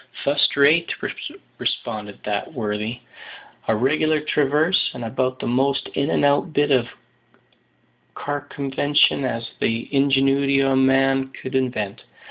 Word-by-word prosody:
"Fust 145 +1 +1
rate," 155 +4 +4 0.7
responded 105 -2 -4
that 105 -1 -2
worthy; 110 +1 -3 0.7
"a 110 - +2
reg'lar 155 +6 +2
traverse, 150 +3 +1
and 120 - -5
about 130 +2 -1
the - - -6
most 135 +3 0
in 140 +2 -1
and - - +2
out 145 +3 +2
bit 145 0 +2
of 125 -3 +3 1.3
carcumvention 145 0 0
as 115 -2 -4
the 115 +1 -1
ingenuity 135 0 +3
o' 135 0 +2
man 135 0 +3
could 130 0 -9
invent. 120 -6 -2
135 Hz, 120 wpm, -22 LUFS, 120-145 Hz, 1.3 s, rate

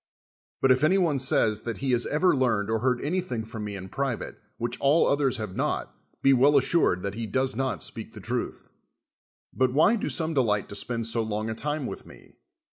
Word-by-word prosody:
But 135 - +5
if 130 +2 +3
any 180 +5 +4
one 165 -7 +1
says 110 -5 +2
that 115 -2 -5
he 135 - -3
lias 120 -1 +2
ever 180 +4 +2
learned 110 -5 +1
or 110 - +1
heard 125 +1 0
anything 170 -7 -2
Irom 110 0 -8
me 105 -1 -5
in 95 -1 -7
private, 135 +2 -4 0.2
which 120 +1 -4
all 145 +4 +4
others 140 -3 +2
have 105 -5 -6
not, - - -2 0.3
be 135 - +6
well 140 +3 +5
as 135 - +4
sni'ed 90 - +1
that 100 -1 -3
he 115 +1 -4
does 130 +3 0
not 130 - -2
sj)eak - - -5
the - - -10
truth. - - -4 0.8
But 130 -1 +1
wliy 205 +9 +4
do - - -2
some 160 -1 -1
delight 110 -8 +1
to 100 - -6
spend 115 +2 -2
so 115 +1 0
long 110 0 -2
a - - -2
time 150 +4 -3
with - - -7
me? - - -16
125 Hz, 215 wpm, -26 LUFS, 110-140 Hz, 0.8 s, be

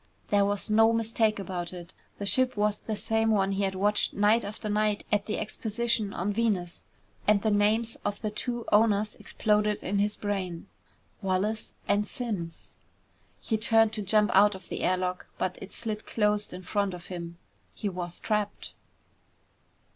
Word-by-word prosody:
There 200 -1 +4
was 205 +1 -1
no 225 +1 +6
mistake 225 -1 +1
about 180 -3 -4
it. 175 -1 -9 0.2
The 200 - -4
ship 255 +5 +2
was 210 0 +1
the 220 - -4
same 225 +1 +1
one 195 -3 +2
he 195 +1 -1
had 190 0 -2
watched 205 +2 +1
night 210 +3 +4
after 210 +1 -5
night 210 0 +1
at 205 -1 +1
the 215 - -1
exposition 220 0 -1
on 200 +3 -2
Venus. 200 -6 -1 0.4
And 205 -1 +4
the 220 - +2
names 215 +3 +2
of 205 0 -2
the 215 -2 -2
two 240 +2 -3
owners 210 -1 +3
exploded 210 -1 +1
in 200 +1 0
his 210 +1 0
brain. 190 -4 -3 0.6
"Wallace 200 +3 -1
and 205 +1 +2
Simms!" 195 -9 -5 0.7
He 220 - 0
turned 225 0 +4
to 215 - -2
jump 210 +1 +3
out 205 +1 +6
of 185 -2 -12
the - - -4
air 185 0 +2
lock, 180 0 -3
but 185 -1 -2
it 195 - -8
slid 215 -2 -4
closed 210 -1 +1
in 180 +1 -8
front 200 0 -1
of 175 0 -10
him. 170 -2 -7 0.4
He 210 - -3
was 180 -2 -4
trapped. 210 -2 -2
210 Hz, 170 wpm, -28 LUFS, 195-215 Hz, 0.7 s, no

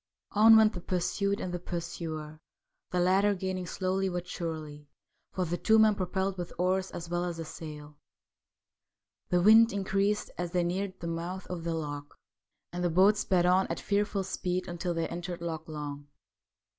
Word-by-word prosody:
On 220 +2 +8
went 220 0 +5
the 175 - -6
pursued 200 +3 -1
and 180 - -4
the 175 - -2
pursuer, 160 -3 -5 0.5
the 180 - 0
latter 195 +3 +3
gaining 185 -1 -3
slowly 190 +2 -1
but 175 0 -4
surely, 155 -3 -5 0.4
for 185 - -1
the 175 +1 -2
two 220 - +4
men 220 -1 +6
propelled 190 0 -2
with 175 - -4
oars 185 +1 +1
as 170 - -7
well 175 +1 -1
as 175 -2 -3
the 165 - -5
sail. 150 -2 -9 1.3
The 175 -1 +2
wind 225 +3 +7
increased 200 +1 0
as 175 -1 -3
they 180 -1 +2
neared 185 +2 -2
the - - -5
mouth 170 +3 -4
of 175 -2 -4
the 165 -1 -1
loch, 145 -2 -6 0.6
and 180 0 -3
the 175 - +2
boats 195 +5 +5
sped 180 -4 +2
on 185 +2 +4
at - - -3
fearful 205 -1 0
speed 180 -1 -2
until 175 0 -3
they 165 0 -1
entered 175 +1 -5
Loch 165 -2 -5
Long. 145 -2 -6
180 Hz, 175 wpm, -30 LUFS, 165-190 Hz, 1.3 s, On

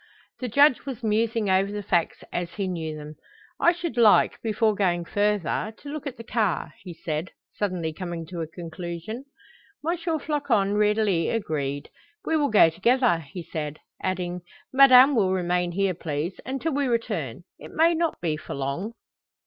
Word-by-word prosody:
The 255 - -3
Judge 280 +3 +4
was 250 -3 -5
musing 220 0 +1
over 190 +1 +2
the 205 0 -4
facts 175 -4 0
as 175 -1 -3
he 200 -2 -2
knew 160 -4 -4
them. 150 0 -9 0.4
"I 345 - +5
should 340 -7 -5
like, 220 -3 +5
before 220 -1 +1
going 175 -4 0
further, 210 +1 0
to 285 - -10
look 295 0 -5
at 260 -2 -6
the 230 - -8
car," 210 -10 -1
he 185 - -8
said, 160 0 -4 0.2
suddenly 180 -6 -2
coming 170 -1 -5
to 170 0 -6
a 160 - -3
conclusion. 170 - -7 0.6
M. 340 - +2
Floçon 290 - 0
readily 210 -4 +2
agreed. 145 -9 -2 0.3
"We 320 - +1
will 295 -2 +2
go 200 -6 +6
together," 235 +2 +3
he 165 +3 -8
said, 150 -2 -5 0.2
adding, 180 -1 -2 0.3
"Madame 265 0 +8
will 190 -5 +3
remain 180 -1 0
here, 195 0 +1
please, 160 +1 -4
until 270 +4 -2
we 280 0 +1
return. 210 - -2 0.2
It - - -10
may 330 +2 +3
not 330 0 -1
be 155 -3 -1
for - - -7
long." 140 +11 -3
195 Hz, 165 wpm, -25 LUFS, 170-240 Hz, 0.6 s, Madame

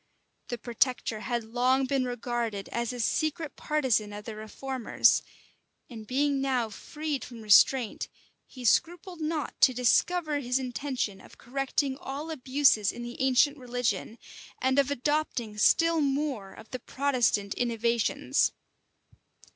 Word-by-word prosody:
The 240 - -4
protector 240 -1 -1
had 235 +1 -2
long 250 +4 +1
been 265 -1 0
regarded 240 -4 -3
as 235 0 -2
a 250 - -7
secret 310 +5 -1
partisan 260 -9 0
of 205 0 -8
the 225 - -6
reformers; 240 +3 +1 0.7
and 220 -2 -9
being 275 +2 +1
now 250 -5 0
freed 300 +5 -4
from 235 -3 -10
restraint, 215 +3 +4 0.4
he 255 -2 -10
scrupled 345 - +1
not 310 -1 -3
to 255 - +6
discover 305 +5 +2
his 250 -2 0
intention 255 -5 -3
of - - -16
correcting 270 +1 -2
all 290 +4 -6
abuses 260 -6 +3
in 240 - -8
the 240 +1 -7
ancient 265 +2 +3
religion, 245 -4 -2 0.4
and 260 +2 +2
of 275 -1 +2
adopting 280 -6 -1
still 330 +7 +4
more 275 -8 -1
of 220 - -14
the 255 - -4
Protestant 245 -7 0
innovations. 235 -1 +1
255 Hz, 130 wpm, -28 LUFS, 235-280 Hz, 0.7 s, to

